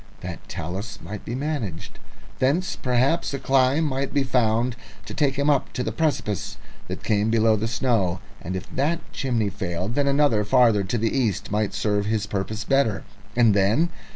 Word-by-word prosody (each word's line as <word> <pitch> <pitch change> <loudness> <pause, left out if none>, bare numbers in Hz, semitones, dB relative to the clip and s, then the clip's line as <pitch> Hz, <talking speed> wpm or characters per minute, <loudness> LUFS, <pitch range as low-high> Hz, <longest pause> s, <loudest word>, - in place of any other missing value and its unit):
That - - -8
talus 100 +5 -5
might 100 +5 -7
be 120 - -3
managed. 130 - -4 0.4
Thence 150 +8 +1
perhaps 135 +5 +1
a - - -4
climb 135 +4 +3
might 140 -1 -2
be 140 - +3
found 120 -1 +1 0.3
to - - -7
take 140 -3 +1
him 140 +1 0
up 145 -3 +2
to 125 - -2
the 110 - -2
precipice 105 - -1 0.3
that - - -6
came 105 0 +1
below 110 -1 +4
the 110 +1 -1
snow; 110 -6 +1 0.2
and 95 - -4
if 95 - -5
that 155 +5 +1
chimney 115 -6 0
failed, 90 +2 -3
then 140 +2 +1
another 140 -6 +3
farther 115 -3 +4
to 95 +6 -1
the 115 +2 0
east 110 -10 0
might 105 0 0
serve 105 -1 0
his 110 -1 0
purpose 105 +1 -3
better. 115 -4 +1 0.3
And 115 -3 +5
then? 105 - +3
115 Hz, 180 wpm, -24 LUFS, 105-135 Hz, 0.4 s, And